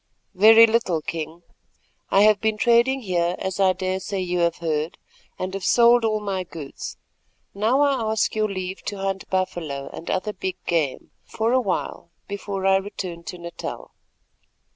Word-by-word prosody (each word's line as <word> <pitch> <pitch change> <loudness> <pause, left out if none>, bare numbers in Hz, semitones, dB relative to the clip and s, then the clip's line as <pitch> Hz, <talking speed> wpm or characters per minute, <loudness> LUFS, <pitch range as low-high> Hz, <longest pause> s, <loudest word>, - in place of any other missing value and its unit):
"Very 220 +4 +8
little, 220 -7 +1
King. 165 +2 -5 0.7
I 195 - +4
have 210 -1 +5
been 220 -1 +1
trading 240 +4 +3
here, 175 -4 0
as 190 0 -4
I 190 -1 +4
daresay 190 +1 -3
you 180 -1 -1
have 170 -1 +1
heard, 155 -1 -2 0.4
and 185 +1 -4
have 195 -1 -5
sold 240 +2 +5
all 215 -1 +1
my 195 -3 -3
goods. 160 -5 -8 0.6
Now 225 +7 +2
I 265 -6 +2
ask 220 - +1
your 215 -1 0
leave 185 -1 -5
to 205 - -4
hunt 195 0 -3
buffalo, 165 -7 -2
and 165 - -8
other 210 +3 -1
big 190 -1 -4
game, 160 -6 -1
for 225 +1 -1
a 260 - +4
while 190 -4 -3 0.2
before 200 -1 -4
I 195 0 +5
return 190 -3 -5
to 180 - -6
Natal." 170 0 -7
190 Hz, 165 wpm, -23 LUFS, 175-215 Hz, 0.7 s, Very